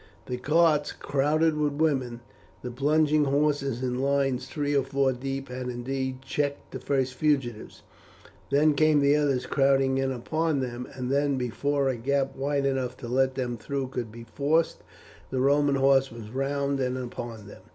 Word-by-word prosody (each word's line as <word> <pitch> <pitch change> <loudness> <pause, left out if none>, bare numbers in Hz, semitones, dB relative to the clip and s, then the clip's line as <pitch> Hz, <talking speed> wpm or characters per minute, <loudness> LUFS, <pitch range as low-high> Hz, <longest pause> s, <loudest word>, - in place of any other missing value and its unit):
The 125 - -4
carts 150 +2 +2
crowded 150 +3 +1
with 150 -1 0
women, 135 -6 0 0.4
the 125 - -4
plunging 150 +3 +2
horses 140 -3 0
in 125 0 -1
lines 135 -2 0
three 145 0 -2
or 140 - +4
four 135 0 +1
deep 135 +1 -5
had 125 0 -5
indeed 130 +1 -4
checked 145 0 -3
the 130 - -6
first 130 0 0
fugitives; 130 -5 -1 0.7
then 150 +2 +4
came 155 0 +4
the 140 +1 +4
others 140 -4 +1
crowding 135 -1 +2
in 135 0 0
upon 155 +4 -1
them, 125 -1 -4
and 125 0 -3
then 140 0 +1
before 140 +3 0
a 130 -2 0
gap 135 +2 0
wide 140 +1 -1
enough 130 -2 -1
to 120 - -8
let 130 +2 +1
them 125 -2 -2
through 135 +3 -3
could 120 -4 -4
be 115 +1 -10
forced, 155 +4 +1 0.5
the 130 - -2
Roman 140 +1 +3
horse 135 0 +3
were 115 - -10
round 135 +4 -2
and 130 -1 -1
upon 120 -4 -6
them. 105 - -12
135 Hz, 170 wpm, -27 LUFS, 125-145 Hz, 0.7 s, or